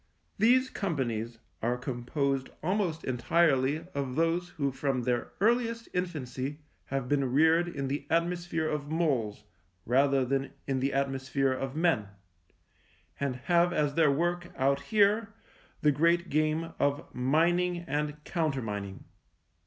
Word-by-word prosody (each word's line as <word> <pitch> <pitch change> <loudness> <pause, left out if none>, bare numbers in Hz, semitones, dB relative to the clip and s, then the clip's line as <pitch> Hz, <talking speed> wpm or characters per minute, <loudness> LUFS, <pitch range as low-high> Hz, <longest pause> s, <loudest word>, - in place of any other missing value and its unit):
These 255 +4 +4
companies 120 - -2 0.2
are 120 +2 0
composed 130 +2 -2
almost 180 -3 0
entirely 140 +3 +2
of 135 -3 -3
those 165 +2 +1
who 140 -5 -2
from 130 -1 -1
their 120 0 -1
earliest 230 +2 +1
infancy 145 -6 -3 0.3
have 135 -2 -3
been 140 -2 +1
reared 160 +5 +4
in 140 -5 -3
the 140 +1 -3
atmosphere 170 -1 0
of 145 -2 -3
moles 130 -11 0 0.4
rather 135 +2 +3
than 135 +1 -1
in 135 -1 -1
the 135 +2 0
atmosphere 135 0 0
of 135 +1 -4
men, 160 - +2 1.1
and 140 -2 -1
have 175 0 +4
as 150 -4 +1
their 160 -1 +4
work 175 +4 0
out 140 +1 +2
here 210 0 +2 0.5
the 150 - +5
great 170 +5 +2
game 155 +2 0
of 145 +2 +1
mining 170 +7 +2
and 150 0 -2
countermining. 115 - -3
145 Hz, 130 wpm, -29 LUFS, 135-170 Hz, 1.1 s, the